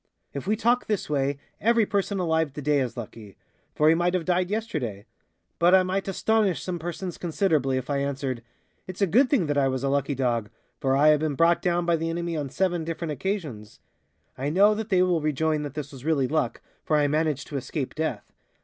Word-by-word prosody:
If 140 Hz, +5 st, -6 dB
we 210 Hz, -, +2 dB
talk 240 Hz, +3 st, +1 dB
this 210 Hz, -7 st, -2 dB
way, 140 Hz, -1 st, 0 dB, 0.2 s
every 230 Hz, 0 st, +3 dB
person 200 Hz, 0 st, -1 dB
alive 160 Hz, -5 st, 0 dB
today 145 Hz, 0 st, +1 dB
is 130 Hz, -2 st, -3 dB
lucky; 110 Hz, -3 st, -9 dB, 0.4 s
for 150 Hz, -, +3 dB
he 160 Hz, -, +7 dB
might 175 Hz, +2 st, +1 dB
have 175 Hz, -3 st, -1 dB
died 180 Hz, 0 st, +1 dB
yesterday. 155 Hz, -, -3 dB, 0.5 s
But 175 Hz, +2 st, +6 dB
I 190 Hz, -, +5 dB
might 190 Hz, +2 st, -2 dB
astonish 205 Hz, -1 st, +1 dB
some 180 Hz, -2 st, -3 dB
persons 175 Hz, +2 st, -5 dB
considerably 155 Hz, -7 st, +1 dB
if 130 Hz, -, -4 dB
I 145 Hz, -, 0 dB
answered: 135 Hz, -3 st, -2 dB, 0.5 s
"It's 185 Hz, +2 st, -3 dB
a -, -, +6 dB
good 250 Hz, -, +3 dB
thing 255 Hz, -, +2 dB
that 145 Hz, -1 st, +1 dB
I 135 Hz, -, +3 dB
was 130 Hz, 0 st, -2 dB
a 135 Hz, -, +1 dB
lucky 140 Hz, 0 st, 0 dB
dog, 120 Hz, -5 st, 0 dB, 0.3 s
for 135 Hz, 0 st, +1 dB
I 150 Hz, +2 st, +6 dB
have 150 Hz, -1 st, +5 dB
been 155 Hz, -2 st, -1 dB
brought 165 Hz, +4 st, +3 dB
down 175 Hz, -1 st, +1 dB
by 170 Hz, -1 st, +2 dB
the 165 Hz, +1 st, -2 dB
enemy 170 Hz, 0 st, -3 dB
on 145 Hz, -3 st, -3 dB
seven 175 Hz, +1 st, 0 dB
different 165 Hz, 0 st, -4 dB
occasions." 145 Hz, -, -4 dB, 0.6 s
I 140 Hz, +2 st, -1 dB
know 200 Hz, +7 st, +5 dB
that 220 Hz, +1 st, -4 dB
they 185 Hz, -2 st, +4 dB
will 175 Hz, -3 st, +1 dB
rejoin 155 Hz, +1 st, 0 dB
that 145 Hz, -1 st, -6 dB
this 150 Hz, -2 st, -5 dB
was 135 Hz, -3 st, -11 dB
really 145 Hz, -4 st, +1 dB
luck, 155 Hz, +4 st, -1 dB, 0.2 s
for 155 Hz, -, +1 dB
I 145 Hz, -, +3 dB
managed 150 Hz, -1 st, 0 dB
to 145 Hz, -, -3 dB
escape 135 Hz, +1 st, -4 dB
death. 155 Hz, -9 st, -4 dB
160 Hz, 215 wpm, -26 LUFS, 140-185 Hz, 0.6 s, he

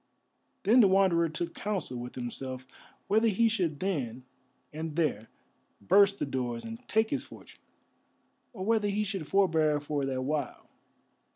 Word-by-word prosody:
Then 225 Hz, +6 st, +5 dB
the 215 Hz, -, +7 dB
Wanderer 185 Hz, -3 st, +3 dB
took 165 Hz, +2 st, -4 dB
counsel 195 Hz, -11 st, -3 dB
with 120 Hz, 0 st, -7 dB
himself 130 Hz, +1 st, -5 dB, 0.4 s
whether 220 Hz, +3 st, +3 dB
he 225 Hz, +2 st, +3 dB
should 180 Hz, -10 st, -1 dB
then 130 Hz, -11 st, -2 dB, 0.5 s
and 160 Hz, 0 st, -5 dB
there 140 Hz, -10 st, -1 dB, 0.5 s
burst 200 Hz, -, +4 dB
the -, -, -2 dB
doors 125 Hz, -4 st, -3 dB
and 225 Hz, 0 st, -7 dB
take 220 Hz, 0 st, +1 dB
his -, -, -1 dB
fortune, -, -, -15 dB, 0.9 s
or 185 Hz, -, -6 dB
whether 220 Hz, -1 st, +2 dB
he 205 Hz, +1 st, 0 dB
should 195 Hz, -7 st, -4 dB
forbear 160 Hz, -6 st, +2 dB
for 145 Hz, -1 st, -3 dB
that 130 Hz, -1 st, -2 dB
while. 145 Hz, -1 st, -3 dB
165 Hz, 150 wpm, -29 LUFS, 135-200 Hz, 0.9 s, the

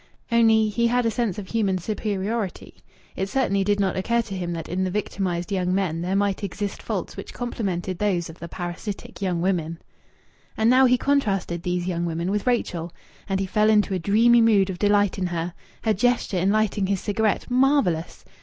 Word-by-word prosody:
Only, 225 Hz, -2 st, +4 dB
he 235 Hz, +3 st, +1 dB
had 245 Hz, +1 st, +1 dB
a 230 Hz, -, +2 dB
sense 220 Hz, -4 st, -1 dB
of 195 Hz, -3 st, -7 dB
human 200 Hz, -5 st, +1 dB
superiority. 205 Hz, +1 st, -3 dB, 0.4 s
It 190 Hz, +1 st, -2 dB
certainly 200 Hz, -7 st, +1 dB
did 205 Hz, +1 st, +1 dB
not 195 Hz, -2 st, +1 dB
occur 235 Hz, +5 st, +1 dB
to 200 Hz, -3 st, -7 dB
him 175 Hz, -2 st, -3 dB
that 165 Hz, -1 st, -5 dB
in 185 Hz, +2 st, -1 dB
the 185 Hz, -, 0 dB
victimized 185 Hz, -2 st, -2 dB
young 185 Hz, -1 st, 0 dB
men 170 Hz, -4 st, -1 dB
there 185 Hz, +2 st, -1 dB
might 200 Hz, 0 st, 0 dB
exist 200 Hz, +1 st, -4 dB
faults -, -, -4 dB
which -, -, -9 dB
complemented 190 Hz, -7 st, -3 dB
those 185 Hz, -5 st, 0 dB
of 165 Hz, -, -12 dB
the 170 Hz, -, -6 dB
parasitic 175 Hz, +5 st, -6 dB
young 180 Hz, -3 st, 0 dB
women. 170 Hz, -3 st, -1 dB, 0.8 s
And 220 Hz, +2 st, +4 dB
now 260 Hz, +1 st, +6 dB
he 250 Hz, 0 st, +4 dB
contrasted 200 Hz, -11 st, 0 dB
these 180 Hz, 0 st, -2 dB
young 175 Hz, -2 st, -1 dB
women 170 Hz, +2 st, -2 dB
with 205 Hz, +3 st, -2 dB
Rachel! 175 Hz, -9 st, -1 dB, 0.4 s
And 195 Hz, 0 st, 0 dB
he 195 Hz, -, 0 dB
fell 210 Hz, +3 st, +2 dB
into 210 Hz, -2 st, +3 dB
a 185 Hz, -, 0 dB
dreamy 230 Hz, +6 st, +4 dB
mood 205 Hz, -4 st, +4 dB
of 175 Hz, -, -8 dB
delight 205 Hz, -1 st, +2 dB
in 185 Hz, -, 0 dB
her.... 170 Hz, 0 st, -3 dB, 0.3 s
Her 220 Hz, -, +2 dB
gesture 230 Hz, -2 st, +1 dB
in 185 Hz, +3 st, +2 dB
lighting 210 Hz, -2 st, +1 dB
his 195 Hz, -1 st, 0 dB
cigarette! 215 Hz, +4 st, -1 dB
Marvellous! 255 Hz, -, +1 dB
195 Hz, 195 wpm, -24 LUFS, 180-220 Hz, 0.8 s, now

